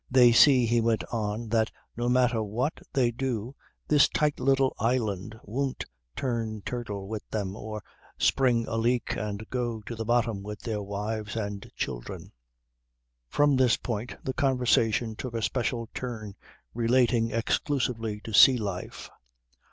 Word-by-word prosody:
"They 125 -2 +7
see," 125 +1 +6
he 115 +1 +2
went 115 -1 +1
on, 110 0 -2
"that 110 -1 +2 0.3
no 120 +1 -1
matter 125 -2 +3
what 115 +8 -2
they 125 -3 +2
do 120 -1 -3 0.3
this 150 -1 +5
tight 150 -1 0
little 135 0 +3
island 110 -3 -1
won't 130 +5 -3 0.3
turn 115 -5 -2
turtle 105 -6 -4
with 110 0 -4
them 100 -3 -3
or 110 -1 -6 0.3
spring 120 -4 +3
a 115 - -2
leak 120 +2 +1
and 105 +1 -4
go 120 -3 -2
to 115 +3 -7
the 110 - -3
bottom 115 -3 +1
with 105 +1 -7
their 110 -3 -3
wives 105 +2 -4
and 100 -3 -4
children." - - -5 1.0
From 145 -1 +3
this 125 -3 +4
point 115 0 -4
the 130 - -2
conversation 125 -5 +2
took 120 +1 -6
a 115 - -1
special 120 -1 -1
turn 110 -5 -5 0.4
relating 120 0 +2
exclusively 115 -2 -1
to 110 - -8
sea 130 +4 +8
life. 100 -5 -5
115 Hz, 145 wpm, -28 LUFS, 110-125 Hz, 1.0 s, sea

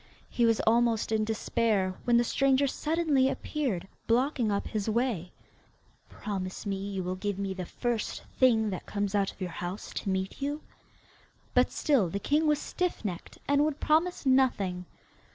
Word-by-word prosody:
He 235 -1 +3
was 225 -1 +3
almost 230 -1 +2
in 215 -1 +2
despair, 215 -3 0
when 240 -1 +4
the 240 - +4
stranger 275 +3 +3
suddenly 300 -2 +1
appeared, 260 - -2 0.2
blocking 245 -1 +2
up 200 - -1
his 215 -1 -2
way. 220 -6 0 0.8
'Promise 190 -2 -5
you 195 -1 -3
will 180 +1 -2
give 200 +1 -3
me 195 -1 -2
the 185 -2 -6
first 240 -3 -2 0.2
thing 225 -5 +4
that 185 - -6
comes 205 -1 -2
out 200 -1 +1
of - - -23
your 185 -2 -3
house 180 +4 -5
to 200 - -3
meet 190 +5 -2
you?' 290 +2 -2 0.9
But - - +4
still 255 - +2
the 195 - -2
king 300 +9 +1
was 300 -1 +4
stiff 360 -3 -3
necked 180 -4 -5
and 285 +1 +4
would 300 -1 -1
promise 325 +2 +1
nothing. 205 -9 +2
225 Hz, 165 wpm, -29 LUFS, 195-270 Hz, 0.9 s, when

